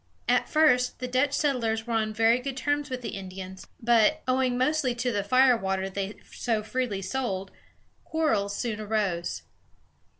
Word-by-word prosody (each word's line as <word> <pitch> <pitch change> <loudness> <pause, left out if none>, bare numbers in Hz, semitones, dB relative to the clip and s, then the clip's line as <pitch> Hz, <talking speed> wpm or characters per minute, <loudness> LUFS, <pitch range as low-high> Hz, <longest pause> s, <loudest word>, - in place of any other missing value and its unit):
At - - +2
first, 250 -6 +3
the 255 - -4
Dutch 255 +3 +1
settlers 230 -7 0
were 235 - -3
on 215 -1 +1
very 225 +3 +3
good 265 +1 -5
terms 290 +1 -1
with 255 -1 -5
the - - -3
Indians; 190 0 -8
but, 240 +6 +3
owing 255 -1 +1
mostly 260 -1 +1
to 245 +1 -1
the 205 -3 -1
fire 255 +4 +5
water 190 -2 -2
they 200 +1 -4 0.2
so 225 -3 -1
freely 220 -4 -2
sold, 195 -5 -3 0.5
quarrels 220 -12 0
soon 220 -2 -3
arose. 205 -5 -1
235 Hz, 160 wpm, -27 LUFS, 200-255 Hz, 0.5 s, fire